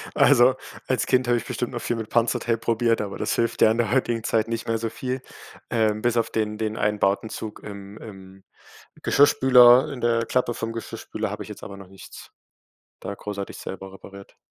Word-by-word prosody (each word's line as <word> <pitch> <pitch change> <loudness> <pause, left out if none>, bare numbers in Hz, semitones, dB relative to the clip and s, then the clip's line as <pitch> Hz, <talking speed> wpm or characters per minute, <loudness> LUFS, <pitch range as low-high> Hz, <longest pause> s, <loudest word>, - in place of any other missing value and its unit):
Also, 125 +2 +5 0.3
als 125 -5 0
Kind 130 +2 +2
habe 120 0 +3
ich - - -5
bestimmt 125 0 -3
noch 120 -2 -5
viel 120 - -2
mit 110 -2 -6
Panzertape 115 0 +1
probiert, 115 0 +1
aber 100 -2 -5
das - - -1
hilft 115 0 -1
ja 110 - +6
in 110 - -1
der 115 -3 0
heutigen 120 -3 0
Zeit 110 0 +1
nicht 115 0 -4
mehr 115 0 0
so 115 0 -3
viel. 130 +3 -4 0.5
Ähm, 110 -2 +1
bis 120 0 +1
auf 115 - +1
den 105 -1 -2
den 110 0 -3
einen 105 0 0
Bowdenzug 105 +2 -2
im 100 0 -9
im 95 -3 -12 0.6
Geschirrspüler, 130 -3 +6
in 135 -4 -7
der 115 -1 +1
Klappe 125 0 0
vom 115 0 -4
Geschirrspüler, 115 - -5
habe - - -5
ich - - -13
jetzt - - -10
aber 100 - -8
noch 100 -1 -12
nichts 95 0 -13 0.7
da - - -6
großartig 100 0 -6
selber 95 0 -8
repariert. 100 0 -13
115 Hz, 200 wpm, -24 LUFS, 105-120 Hz, 0.7 s, ja